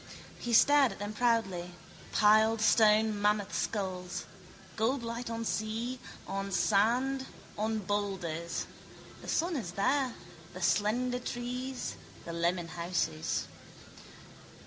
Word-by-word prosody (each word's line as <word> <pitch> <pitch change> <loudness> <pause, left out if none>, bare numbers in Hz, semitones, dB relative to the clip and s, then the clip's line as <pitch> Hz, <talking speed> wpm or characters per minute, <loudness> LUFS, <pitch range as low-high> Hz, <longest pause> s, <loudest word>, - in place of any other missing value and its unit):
He 240 - -4
stared 280 +2 +6
at - - -12
them 205 +1 -5
proudly, 205 -7 0 0.4
piled 220 +1 +5
stone 215 -1 +4
mammoth 210 -1 +1
skulls. 185 -4 -3 0.5
Gold 240 +4 0
light 235 +1 -4
on 230 0 -3
sea, 225 +4 -2 0.3
on 195 0 -3
sand, 245 +8 +2 0.3
on 220 +1 -1
boulders. 190 -5 -2 0.6
The - - -11
sun 340 +1 +1
is 180 - -4
there, 255 +5 +1 0.4
the 185 - -7
slender 240 +7 +1
trees, 250 +2 -4 0.3
the 170 - -5
lemon 170 0 0
houses. 170 - -1
215 Hz, 110 wpm, -31 LUFS, 195-240 Hz, 0.6 s, stared